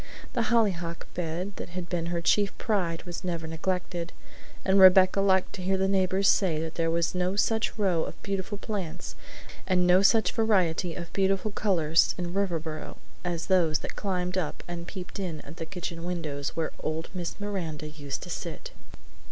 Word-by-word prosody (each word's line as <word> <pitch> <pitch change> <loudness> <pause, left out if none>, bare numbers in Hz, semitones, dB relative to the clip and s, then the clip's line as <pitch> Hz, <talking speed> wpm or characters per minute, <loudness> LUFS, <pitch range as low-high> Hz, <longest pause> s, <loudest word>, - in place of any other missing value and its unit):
The 235 -3 +1
hollyhock 180 -8 +1
bed 180 +3 -3
that - - -6
had 175 0 -5
been 170 -1 -2
her 170 0 -1
chief 200 +3 +2
pride 180 -7 0
was 175 +1 -6
never 170 -3 -2
neglected, 175 +1 -3 0.5
and 195 +1 +4
Rebecca 185 +1 +7
liked 190 -1 +3
to 190 - -6
hear 190 +1 +1
the 190 0 +2
neighbors 190 0 +2
say 175 -6 +3
that 160 0 -4
there 165 -1 0
was 170 0 +1
no 180 +1 0
such 220 +3 +1
row 185 -6 +2
of - - -8
beautiful 200 +1 -3
plants 185 -5 -5 0.5
and 180 -2 +3
no 180 +1 +6
such 200 0 +4
variety 185 -7 +1
of 170 -2 -7
beautiful 195 +2 +1
colors 165 -6 +3
in 175 -1 -3
Riverboro 165 -5 -2 0.3
as 175 -2 -2
those 175 -5 +3
that - - -6
climbed 180 -2 -1
up 160 -5 -4
and 170 -1 -6
peeped 185 0 -7
in 175 -5 -3
at 150 +3 -12
the 165 - -5
kitchen 175 -3 -5
windows 155 -5 -3
where 160 -1 -1
old 160 +1 -3
Miss 175 -1 -4
Miranda 170 -7 -4
used 145 -2 -5
to - - -8
sit. - - -5
180 Hz, 175 wpm, -28 LUFS, 165-195 Hz, 0.5 s, Rebecca